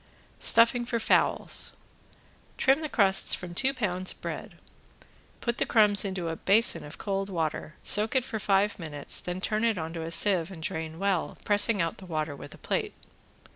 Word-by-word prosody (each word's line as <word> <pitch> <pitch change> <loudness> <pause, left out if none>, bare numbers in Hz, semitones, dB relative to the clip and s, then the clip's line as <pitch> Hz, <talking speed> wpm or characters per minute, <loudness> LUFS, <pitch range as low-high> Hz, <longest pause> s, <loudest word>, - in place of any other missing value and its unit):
~STUFFING 230 +1 +4
FOR 235 -2 -1
FOWLS~ - - +2 0.8
Trim 270 +2 +3
off - - -8
the - - -4
crusts 195 -6 +3
from 175 -1 -8
two 265 +9 +1
pounds 185 -8 -1
of - - -18
bread, - - -7 0.9
put 235 -1 -2
the - - +1
crumbs 210 -2 +4
into 190 -4 -4
a 165 - -3
basin 210 +7 +2
of 150 - -11
cold 195 -1 -3
water, 160 -3 -3
soak 215 +4 +3
it 260 -2 +2
for 220 - -5
five 200 0 +1
minutes 150 -4 +2
then 180 +1 -5
turn 215 +3 -2
it 230 -3 +1
onto 165 0 -5
a 160 - -5
sieve 170 -1 +2
and 170 -4 -10
drain 160 0 -5
well, 195 -2 -1
pressing 205 -2 +3
out 165 - -4
the 190 - -12
water 155 -3 -3
with - - -11
a - - -16
plate. - - -3
195 Hz, 185 wpm, -27 LUFS, 165-220 Hz, 0.9 s, ~STUFFING